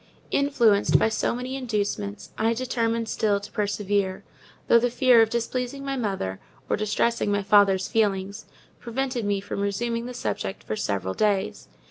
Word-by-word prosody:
Influenced 240 -8 +3
by - - +2
so 220 - 0
many 250 +2 -4
inducements, 205 - -3
I 225 +1 +1
determined 230 -2 -1
still 210 -2 +1
to 200 - -11
persevere; 205 -2 -1 0.4
though 235 - +6
the 245 +1 +1
fear 245 -1 +5
of 225 - +3
displeasing 250 +4 -3
my 275 0 -2
mother, 195 - -3 0.3
or - - +1
distressing 215 +1 0
my 205 0 0
father's 195 -2 +4
feelings, 200 -1 -1 0.3
prevented 250 -1 -3
me 205 -1 +1
from 200 - -5
resuming 230 +4 -1
the 250 - -7
subject 95 - -3
for 110 - -3
several 95 -3 -2
days. 205 - 0
220 Hz, 155 wpm, -25 LUFS, 200-240 Hz, 0.4 s, though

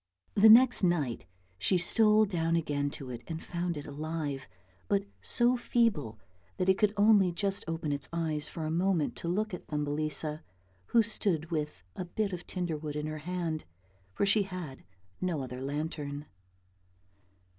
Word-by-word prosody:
The 215 +2 +7
next 245 +3 +8
night 145 - 0 0.3
she 185 - +3
stole 215 +4 +5
down 165 -4 0
again 145 -3 0
to 135 -2 -7
it 120 -1 -6
and 160 -1 -4
found 175 -1 -3
it 145 - -6
alive, 150 -2 -4 0.4
but 200 -1 +2 0.2
so 240 +1 +3
feeble 225 - +1 0.4
that 185 - 0
it 190 0 +4
could 210 -1 +4
only 205 -3 +5
just 195 +3 -2
open 165 -2 -2
its 140 -1 -3
eyes 160 -3 -2
for 160 - -5
a 155 - -2
moment 175 -2 +1
to - - -5
look 210 +4 -1
at 180 - -7
Thumbelisa 150 +1 -2 0.5
who 230 - +4
stood 180 -7 -1
with 150 - -3
a 185 - -4
bit 200 +3 -2
of 175 -1 -6
tinder 175 -4 -2
wood 150 -1 -5
in 150 0 -2
her 155 0 -4
hand, 165 -1 -3 0.5
for - - +2
she 205 +2 +4
had 180 -8 -6 0.4
no 170 -6 -1
other 125 0 -6
lantern. 145 0 -4
165 Hz, 165 wpm, -30 LUFS, 150-195 Hz, 0.5 s, next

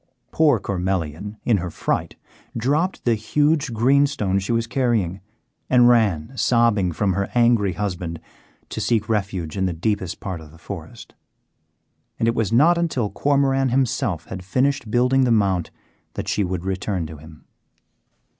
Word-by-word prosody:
Poor 150 -7 +3
Cormelian, 95 +1 -3
in 115 -4 +3
her 90 -1 -4
fright, - - -2 0.4
dropped 150 +10 0
the 120 - +4
huge 145 +6 +1
greenstone 120 -4 +2
she 100 - -3
was 115 0 +1
carrying, 115 -8 0 0.5
and 125 -1 +6
ran 110 - +2
sobbing 115 -7 +2
from 95 +4 0
her 100 +1 -2
angry 115 -5 +3
husband 90 -4 -4 0.5
to 110 - -4
seek 110 +1 +1
refuge 95 -7 -2
in 95 -1 0
the 90 - -2
deepest 95 +1 -2
part 95 -4 -5
of 80 - -13
the 80 - -16
forest; - - -9 1.0
and 115 - 0
it 115 - +3
was 110 -3 -1
not 160 +9 +4
until 130 -11 -1
Cormoran 135 -2 +1
himself 120 - 0
had 95 0 -7
finished 130 +5 0
building 125 +3 +3
the 125 - +2
Mount 95 -6 +1 0.5
that - - -4
she 105 - 0
would 90 -1 -3
return 95 -2 -2
to 80 0 -9
him. 80 +1 -15
105 Hz, 155 wpm, -22 LUFS, 95-125 Hz, 1.0 s, and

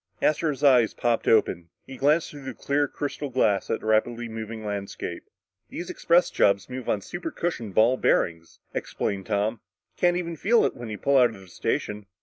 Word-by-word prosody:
Astro's 150 -2 0
eyes 125 -5 +5
popped 120 -1 0
open. 90 -6 +2 0.2
He 135 - -9
glanced 150 +5 +2
through 145 -2 -11
the 130 -3 -6
clear 145 +1 0
crystal 145 +1 -4
glass 105 -6 +1
at 115 - -1
the - - -10
rapidly 115 +2 +1
moving 110 -1 -6
landscape. 100 -4 -5 0.4
"These 175 - -6
express 170 +1 +3
jobs 100 0 +2
move 130 -1 -5
on 105 - +1
supercushioned 165 - -4
ball 120 +4 +5
bearings," 85 -7 0 0.2
explained 95 -1 -3
Tom. 105 +1 0 0.4
"You - - -25
can't 175 0 +4
even 170 -2 -4
feel 230 +6 +3
it - - -1
when 120 -2 -7
you 105 - -5
pull 140 +4 +2
out 120 -3 +4
of - - -13
the 95 - -15
station." 105 +3 -3
120 Hz, 185 wpm, -26 LUFS, 105-145 Hz, 0.4 s, eyes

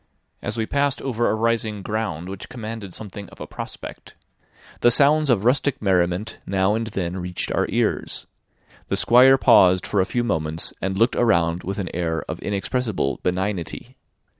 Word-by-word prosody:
As - - -4
we 110 - 0
passed 140 +2 0
over 120 -3 0
a - - +1
rising 110 -2 -1
ground 105 -6 -3
which 95 0 -8
commanded 110 -4 -7
something 100 0 -8
of - - -16
a - - -6
prospect, - - -9 0.6
the 120 - +5
sounds 145 +4 +5
of 110 -4 +2
rustic 130 +2 +2
merriment 90 +1 0
now 95 +1 +2
and 115 +1 -2
then 95 -4 -3
reached 90 -1 -3
our - - +1
ears; - - -1 0.6
the - - 0
Squire 130 +3 +6
paused 90 -7 +5
for 100 - +1
a - - +1
few 120 +3 -1
moments, 80 -6 -2
and 95 +1 -2
looked 115 +4 +3
around 85 -7 +2
with 95 +2 -4
an 95 -3 -3
air 80 -2 -1
of - - -5
inexpressible 100 - -2
benignity. 95 +6 -3
105 Hz, 165 wpm, -22 LUFS, 90-120 Hz, 0.6 s, Squire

